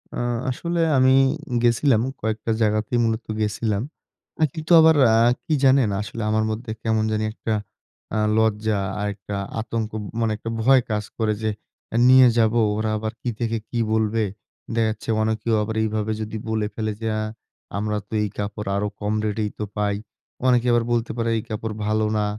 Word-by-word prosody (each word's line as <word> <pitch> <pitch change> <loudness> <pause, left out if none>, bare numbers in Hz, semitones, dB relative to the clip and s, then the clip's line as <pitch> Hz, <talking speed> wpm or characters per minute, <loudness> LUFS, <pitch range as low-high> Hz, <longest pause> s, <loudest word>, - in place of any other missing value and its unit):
আ - - -3 0.3
আসলে 170 +6 -2 0.2
আমি 130 0 +5 0.5
গেসিলাম 120 0 +3 0.2
কয়েকটা 110 0 -2
জায়গাতেই 110 +2 +1
মূলত 110 0 -1 0.2
গেসিলাম। 105 0 -1 0.7
কিন্তু 160 +1 -5
আবার 160 0 +6 0.2
আ - - +5 0.3
কি 160 - 0
জানেন? 130 -4 +5
আসলে 110 +2 -6
আমার 110 0 +2
মধ্যে 110 +1 -5
কেমন 110 -1 +1
জানি 110 0 0
একটা 110 - -3 0.6
আ - - +1 0.2
লজ্জা 110 -1 +1 0.2
আর 105 - -1
একটা 100 +1 -7 0.2
আতঙ্ক 110 -1 -3 0.3
মানে 115 -1 +1
একটা 115 - -6
ভয় 130 +3 +5
কাজ 105 0 0
করে 110 -2 +1
যে, 110 - +1 0.5
"এ - - +2
নিয়ে 130 0 +8
যাবো, 115 +1 +3 0.2
ওরা 110 0 -1
আবার 110 +1 -4
কি 125 - -2
থেকে 115 -1 -1
কি 120 - -2
বলবে?" 110 0 +1 0.5
দেখা 115 -1 +2
যাচ্ছে 110 +1 -6
অনেকেও 110 +1 0
আবার 110 +1 -4
এইভাবে 110 0 -1
যদি 110 0 -4
বলে 110 -1 0
ফেলে 110 -1 -2
যে, 115 - -2
"আ - - -1 0.6
আমরা 105 +1 -1
তো - - -12
এই 105 - -1
কাপড় 105 0 -4
আরো 105 +1 0
কম 105 0 -1
রেটেই 105 0 -1
তো - - -1
পাই।" 105 -1 +1 0.5
অনেকে 125 -1 +3
আবার 120 -1 +3
বলতে 120 -1 0
পারে, 115 0 0
"এই 110 - -3
কাপড় 110 0 -3
ভালো 110 0 +1
না।" 105 - +1
110 Hz, 175 wpm, -23 LUFS, 105-115 Hz, 0.7 s, নিয়ে